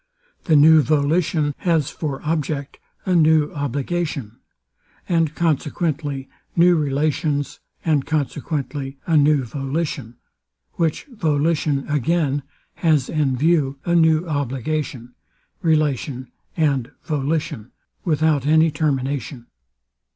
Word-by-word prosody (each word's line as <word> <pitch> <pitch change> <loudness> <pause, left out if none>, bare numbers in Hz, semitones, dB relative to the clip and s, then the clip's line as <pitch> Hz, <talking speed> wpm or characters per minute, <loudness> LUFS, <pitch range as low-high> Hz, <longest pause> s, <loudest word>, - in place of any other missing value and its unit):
The 160 - +3
new 155 +2 +7
volition 150 0 +1
has 165 -6 +1
for 145 -4 -4
object 150 -3 -2 0.3
a 185 - +1
new 155 -3 +4
obligation, 145 -3 -3 0.7
and 165 -3 +1
consequently 150 -3 -1 0.3
new 175 +1 +5
relations, 145 0 -1 0.3
and 150 -4 +2
consequently 145 -2 -3
a 165 - +1
new 145 -2 +4
volition; 135 -1 -4 0.6
which 165 -3 -1
volition 155 - 0
again 150 0 +1 0.4
has 155 -6 +2
in 145 -5 0
view 145 -2 +2
a 170 - +1
new 160 0 +3
obligation, 135 -3 -3 0.5
relation 145 -6 0 0.3
and 140 -6 +1
volition, 150 -4 -2 0.3
without 155 -4 +1
any 160 +1 +4
termination. 140 -4 -2
150 Hz, 100 wpm, -21 LUFS, 140-160 Hz, 0.7 s, new